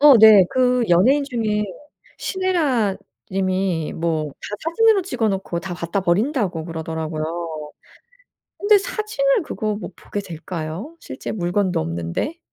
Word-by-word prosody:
어 285 Hz, -3 st, +9 dB
네. 215 Hz, -3 st, +9 dB
그 250 Hz, -1 st, +3 dB
연예인 255 Hz, +12 st, +4 dB
중에 220 Hz, -5 st, -1 dB, 0.5 s
신애라 305 Hz, -, +1 dB, 0.3 s
님이 185 Hz, -4 st, 0 dB
뭐 160 Hz, -2 st, -1 dB
"다 210 Hz, +8 st, -7 dB
사진으로 405 Hz, +4 st, +4 dB
찍어 240 Hz, -, -1 dB
놓고 190 Hz, -3 st, -2 dB
다 185 Hz, -2 st, -5 dB
갖다 170 Hz, +3 st, -2 dB
버린다."고 190 Hz, -, 0 dB
그러더라고요. 160 Hz, -1 st, -4 dB, 0.9 s
근데 410 Hz, +1 st, +5 dB
사진을 430 Hz, +2 st, 0 dB
그거 215 Hz, -7 st, -2 dB
뭐 -, -, -6 dB
보게 205 Hz, -, -5 dB
될까요? 175 Hz, -, -6 dB
실제 130 Hz, -, -6 dB
물건도 185 Hz, -1 st, 0 dB
없는데? 85 Hz, -, -3 dB
200 Hz, 275 characters per minute, -21 LUFS, 170-275 Hz, 0.9 s, 어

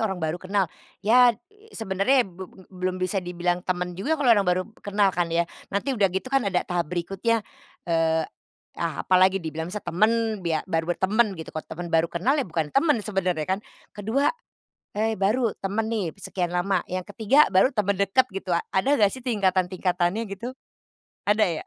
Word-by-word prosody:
orang 190 Hz, -2 st, -3 dB
baru 160 Hz, +2 st, -2 dB
kenal, 195 Hz, +1 st, +1 dB, 0.4 s
ya 245 Hz, +2 st, +6 dB, 0.4 s
sebenarnya 225 Hz, +5 st, +2 dB
b 185 Hz, 0 st, -10 dB, 0.2 s
belum 185 Hz, 0 st, -2 dB
bisa 185 Hz, +1 st, -1 dB
dibilang 175 Hz, 0 st, -1 dB
teman 180 Hz, -1 st, -2 dB
juga 285 Hz, -, 0 dB
kalau 280 Hz, -5 st, +3 dB
orang 205 Hz, -3 st, +3 dB
baru 180 Hz, +1 st, +2 dB, 0.2 s
kenal 205 Hz, 0 st, +2 dB
kan 175 Hz, -1 st, 0 dB
ya. 170 Hz, +1 st, +1 dB, 0.3 s
Nanti 200 Hz, +8 st, 0 dB
udah 210 Hz, -6 st, +3 dB
gitu 190 Hz, +7 st, -3 dB
kan 270 Hz, -5 st, +2 dB
ada 180 Hz, -2 st, 0 dB
tahap 175 Hz, -3 st, -2 dB
berikutnya. 195 Hz, +6 st, -1 dB, 0.4 s
Eee, 165 Hz, -1 st, +1 dB, 0.6 s
ah, 170 Hz, -2 st, -2 dB
apalagi 185 Hz, +1 st, +4 dB
dibilang 160 Hz, 0 st, -4 dB
misal 210 Hz, +3 st, -6 dB
temen, 220 Hz, +3 st, +1 dB
bia 160 Hz, -2 st, 0 dB
baru 165 Hz, -1 st, -1 dB
bertemen 210 Hz, +1 st, +2 dB
gitu. 160 Hz, -, -8 dB
Kalo 155 Hz, -, -5 dB
temen 175 Hz, +2 st, -6 dB
baru 165 Hz, 0 st, +3 dB
kenal 175 Hz, +11 st, +1 dB
ya -, -, -1 dB
bukan 160 Hz, -2 st, -2 dB
temen 295 Hz, +1 st, +3 dB
sebenernya 180 Hz, -6 st, -1 dB
kan. 190 Hz, +1 st, 0 dB, 0.3 s
Ke-2, 220 Hz, +7 st, 0 dB, 0.6 s
eee, 220 Hz, +1 st, 0 dB
baru 220 Hz, +4 st, +2 dB
temen 205 Hz, +3 st, -2 dB
nih 220 Hz, -4 st, -1 dB
sekian 180 Hz, -3 st, -3 dB
lama, 180 Hz, +1 st, 0 dB
yang 185 Hz, 0 st, -3 dB
ke-3 225 Hz, +8 st, +4 dB
baru 200 Hz, +8 st, +4 dB
temen 200 Hz, -4 st, 0 dB
deket 200 Hz, +6 st, +3 dB
gitu. 190 Hz, -2 st, -3 dB, 0.2 s
Ada 270 Hz, +10 st, +2 dB
nggak 205 Hz, -2 st, +5 dB
sih 260 Hz, -, -7 dB
tingkatan-tingkatannya 185 Hz, -2 st, +1 dB
gitu? 230 Hz, +6 st, -6 dB, 0.8 s
Ada 210 Hz, +1 st, +4 dB, 0.2 s
ya? -, -, -29 dB
190 Hz, 175 wpm, -25 LUFS, 175-220 Hz, 0.8 s, ya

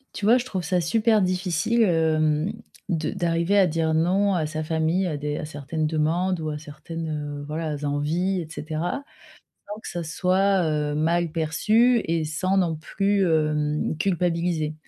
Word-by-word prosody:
Tu 200 Hz, -, -3 dB
vois, 235 Hz, +3 st, +6 dB
je 250 Hz, -, -2 dB
trouve 190 Hz, -7 st, -3 dB
ça 180 Hz, +2 st, +1 dB
super 215 Hz, +5 st, +2 dB
difficile, 185 Hz, +4 st, +1 dB
hem, 160 Hz, -1 st, +2 dB, 0.4 s
de 160 Hz, -4 st, -1 dB
d'arriver 170 Hz, +3 st, +1 dB
à 195 Hz, -, +6 dB
dire 160 Hz, -1 st, 0 dB
non 190 Hz, +5 st, +2 dB
à 160 Hz, -3 st, 0 dB
sa 155 Hz, +1 st, -4 dB
famille, 160 Hz, +4 st, 0 dB
à 160 Hz, -, -2 dB
des 150 Hz, 0 st, -3 dB
à -, -, -4 dB
certaines 150 Hz, +1 st, -3 dB
demandes 165 Hz, +3 st, 0 dB
ou 155 Hz, -, -2 dB
à 150 Hz, -, -3 dB
certaines, 155 Hz, +2 st, -7 dB, 0.3 s
heu, 145 Hz, -, -7 dB
voilà, 155 Hz, 0 st, -3 dB
envies 165 Hz, +6 st, 0 dB
et 165 Hz, -, -7 dB
cetera 160 Hz, -, -4 dB, 0.7 s
sans 210 Hz, -, -7 dB
que -, -, -8 dB
ça 175 Hz, -1 st, -4 dB
soit, 190 Hz, +3 st, +2 dB
heu, 150 Hz, -1 st, -1 dB
mal 165 Hz, +2 st, +1 dB
perçu 215 Hz, +10 st, +3 dB
et 165 Hz, -1 st, 0 dB
sans 185 Hz, +5 st, 0 dB
non 170 Hz, -4 st, +1 dB
plus, 195 Hz, +4 st, 0 dB
hem, 150 Hz, -1 st, 0 dB
culpabiliser. 170 Hz, -4 st, 0 dB
165 Hz, 170 wpm, -24 LUFS, 155-185 Hz, 0.7 s, vois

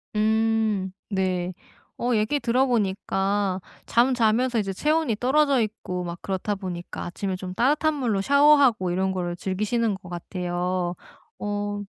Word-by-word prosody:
음, 220 Hz, -2 st, +1 dB, 0.2 s
네. 185 Hz, -2 st, -1 dB, 0.4 s
어 245 Hz, -, -1 dB
얘기 220 Hz, +7 st, +1 dB
들어보니까 200 Hz, -6 st, 0 dB, 0.2 s
잠자면서 240 Hz, 0 st, +2 dB
이제 195 Hz, -2 st, -2 dB
체온이 300 Hz, -, +1 dB
떨어져 275 Hz, 0 st, +3 dB
있고 205 Hz, -4 st, -3 dB
막 170 Hz, 0 st, -6 dB
그렇다 195 Hz, +2 st, -2 dB
보니까 180 Hz, -3 st, -6 dB
아침에 190 Hz, +2 st, -3 dB
좀 185 Hz, 0 st, -6 dB
따뜻한 295 Hz, +8 st, +2 dB
물로 230 Hz, -8 st, 0 dB
샤워하고 280 Hz, -7 st, +5 dB
이런 190 Hz, +2 st, 0 dB
거를 175 Hz, -2 st, -2 dB
즐기시는 210 Hz, +4 st, -1 dB
것 190 Hz, -2 st, -12 dB
같아요. 180 Hz, 0 st, -2 dB, 0.4 s
어 205 Hz, 0 st, -3 dB
205 Hz, 285 characters per minute, -25 LUFS, 185-240 Hz, 0.4 s, 샤워하고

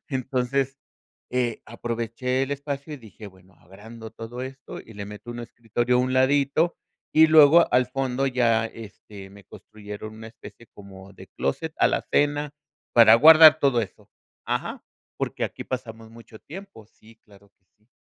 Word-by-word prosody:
Entonces, 130 Hz, 0 st, -2 dB, 0.6 s
eh, 125 Hz, -2 st, -1 dB
aproveché 120 Hz, +3 st, -3 dB
el 135 Hz, -, -6 dB
espacio 140 Hz, +1 st, -5 dB
y -, -, -7 dB
dije: 110 Hz, -3 st, -13 dB
"Bueno, 95 Hz, -1 st, -20 dB
agrando 110 Hz, +6 st, -13 dB
todo 120 Hz, +2 st, -8 dB
esto 130 Hz, 0 st, -9 dB
y 110 Hz, -, -14 dB
le 100 Hz, 0 st, -7 dB
meto 105 Hz, +3 st, -11 dB
un 120 Hz, -, -7 dB
escritorio 120 Hz, +1 st, -2 dB
a -, -, +2 dB
un 130 Hz, 0 st, -1 dB
ladito". 140 Hz, +5 st, +1 dB, 0.4 s
Y 160 Hz, +1 st, +6 dB
luego, 155 Hz, +1 st, +6 dB
al 125 Hz, 0 st, +3 dB
fondo, 135 Hz, 0 st, -2 dB
ya, 120 Hz, -3 st, +1 dB
este, 105 Hz, -3 st, -12 dB
me 100 Hz, 0 st, -16 dB
construyeron 105 Hz, +2 st, -11 dB
una 110 Hz, 0 st, -10 dB
especie 115 Hz, 0 st, -15 dB
como 100 Hz, -1 st, -14 dB
de -, -, -14 dB
closet, -, -, -4 dB
alacena, 145 Hz, 0 st, 0 dB, 0.4 s
para 115 Hz, -2 st, +8 dB
guardar 155 Hz, +3 st, +8 dB
todo 135 Hz, -5 st, +2 dB
eso 100 Hz, -, -10 dB, 0.4 s
Ajá, -, -, -3 dB, 0.4 s
porque -, -, -3 dB
aquí -, -, -5 dB
pasamos 115 Hz, -3 st, -7 dB
mucho 115 Hz, -1 st, -15 dB
tiempo. 190 Hz, -, -12 dB
Sí, 115 Hz, +1 st, -22 dB
claro 100 Hz, -1 st, -21 dB
que 95 Hz, -, -48 dB
sí. 105 Hz, +1 st, -37 dB
120 Hz, 155 wpm, -24 LUFS, 110-135 Hz, 0.6 s, para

